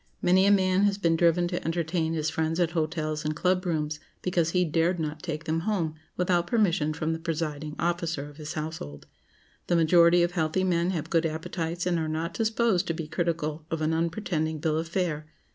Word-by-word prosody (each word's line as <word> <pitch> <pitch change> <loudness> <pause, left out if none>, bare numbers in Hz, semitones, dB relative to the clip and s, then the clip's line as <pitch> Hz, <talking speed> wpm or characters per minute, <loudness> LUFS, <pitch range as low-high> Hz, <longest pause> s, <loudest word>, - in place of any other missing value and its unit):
Many 185 +2 +4
a - - +6
man 190 0 +4
has 200 -1 +2
been 170 -4 +2
driven 170 +1 +3
to 175 - -3
entertain 165 0 -1
his 155 -1 -1
friends 160 +1 -1
at 170 -2 +2
hotels 155 -1 -2
and 155 0 -1
club 180 +2 +1
rooms, 150 -2 -1 0.2
because 175 -3 +1
he 180 +1 +2
dared 165 +3 +1
not 155 -1 -3
take 155 -3 -4
them 165 0 0
home 170 -4 -1 0.2
without 175 -1 +1
permission 180 -9 +2
from 155 +1 -2
the 160 - -4
presiding 155 -2 -3
officer 170 -4 -1
of 145 -1 -14
his 155 -1 -6
household. 155 - -6 0.6
The 175 - +2
majority 170 +1 +5
of 175 - +1
healthy 170 +1 0
men 175 -1 +1
have 170 -5 -3
good 165 0 +3
appetites 165 +2 -3
and 175 -2 +1
are 160 -1 -2
not 160 +2 -2
disposed 220 -4 +1
to 165 - -1
be 160 -1 -5
critical 155 -1 -2
of 165 - -2
an 155 +1 +1
unpretending 160 -1 -1
bill 155 +1 0
of 165 - -3
fare. 165 -4 -2
165 Hz, 200 wpm, -27 LUFS, 155-175 Hz, 0.6 s, a